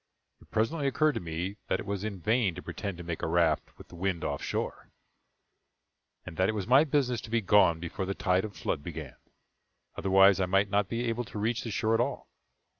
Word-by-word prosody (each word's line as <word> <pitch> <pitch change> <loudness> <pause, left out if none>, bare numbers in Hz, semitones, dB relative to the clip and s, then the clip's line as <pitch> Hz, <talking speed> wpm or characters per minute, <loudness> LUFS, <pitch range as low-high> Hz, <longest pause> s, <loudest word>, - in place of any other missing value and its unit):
It - - -20
presently 140 +7 0
occurred 155 +3 +3
to - - -3
me 90 +4 -4
that - - 0
it - - -6
was 100 -1 -3
in 105 -3 -4
vain 110 0 +1
to 90 - -8
pretend 100 -4 -5
to 90 - -8
make 85 -1 -4
a - - -1
raft 80 -2 +1
with - - -14
the - - -12
wind 90 -1 -2
off - - -2
shore; - - -4 1.4
and 80 - -9
that 95 +2 +2
it 110 - -1
was 100 -3 -2
my 130 +5 +6
business 135 -6 0
to - - -10
be 115 +1 +2
gone 100 -5 +4
before 85 +3 -4
the 95 - -2
tide 90 0 +1
of 110 -2 -6
flood - - -2
began, 75 -5 -7 0.8
otherwise 95 0 +5
I 95 - +1
might 95 +2 +2
not 100 -1 +1
be 120 +1 -2
able 120 +1 -1
to 105 - -9
reach 110 +2 0
the 115 - -4
shore 110 +1 0
at 115 - +3
all. - - -3
100 Hz, 225 wpm, -29 LUFS, 90-115 Hz, 1.4 s, my